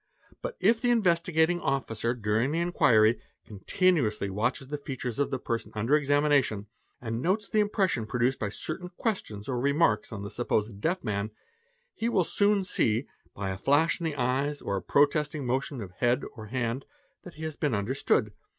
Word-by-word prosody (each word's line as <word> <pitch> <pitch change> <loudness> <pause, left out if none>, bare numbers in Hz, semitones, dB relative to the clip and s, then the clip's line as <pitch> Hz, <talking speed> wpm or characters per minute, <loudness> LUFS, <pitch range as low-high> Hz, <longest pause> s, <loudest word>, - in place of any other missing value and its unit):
But - - -5
if 225 +3 +3
the 245 - +2
Investigating 175 -6 +2
Officer 120 -5 -1
during 110 +3 0
the 160 - -1
inquiry 115 -10 +4 0.3
con 105 -3 -10
tinuously 125 - +2
watches 120 +6 -1
the 150 0 -3
features 130 -4 -5
of 145 - +1
the 135 - -1
person 115 -2 -3
under 115 +7 +2
examination 145 -7 +2 0.3
and 115 0 -3
notes 195 +6 0
the 215 - +1
impression 195 - +1
produced 125 +3 0
by 105 - -1
certain 165 - -5
questions 110 - -3
or 125 -2 -1
remarks 140 -4 +2
on 105 -2 -6
the 100 - -6
supposed 110 -3 -1
deaf 180 - 0
man, 105 -1 -2 0.6
he 230 +1 -1
will 190 -6 +3
soon 200 +3 +2
see, 120 - +1 0.3
by 95 -1 -3
a 95 - -4
flash 150 - +3
in - - -6
the 160 -3 -1
eyes 135 +3 0
or 100 - -3
a 95 - -2
protesting 150 +1 +2
o - - -5
motion 130 +1 -2
of 95 -3 -7
head 120 +6 +1
or 110 -2 -9
hand, 120 +2 -2 0.4
that 180 - -12
he 155 - -8
has 155 -2 -4
been 145 -6 0
understood. 105 -1 0
135 Hz, 185 wpm, -28 LUFS, 110-165 Hz, 0.6 s, inquiry